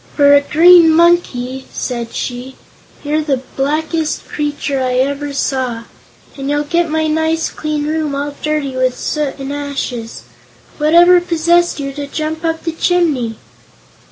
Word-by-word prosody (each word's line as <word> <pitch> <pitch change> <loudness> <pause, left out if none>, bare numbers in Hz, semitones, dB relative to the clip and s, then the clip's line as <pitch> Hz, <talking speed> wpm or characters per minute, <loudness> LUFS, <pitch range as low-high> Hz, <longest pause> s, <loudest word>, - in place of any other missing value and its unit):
"For 285 -1 +5
a 285 - +6
Green 335 +3 +6
Monkey," 295 -7 +1
said 235 -2 -4
she, 250 +1 -5 0.5
"you're 300 +1 0
the 275 -4 -1
blackest 310 +3 -1
creature 290 -2 -2
I 255 -1 0
ever 280 +3 -1
saw. 260 -4 -2 0.5
And 275 0 -5
you'll 290 0 0
get 340 +3 0
my 315 0 0
nice 320 +1 0
clean 305 -1 -3
room 305 -2 -2
all 285 +1 -3
dirty 300 -3 -2
with 255 -1 0
soot 300 -3 -2
and 275 0 -5
ashes. 270 - -5 0.6
Whatever 345 +4 +5
possessed 345 0 +1
you 275 -1 -4
to 285 0 -6
jump 310 +2 -4
up 325 0 -2
the 330 - -2
chimney?" 320 -9 0
290 Hz, 145 wpm, -16 LUFS, 270-320 Hz, 0.6 s, a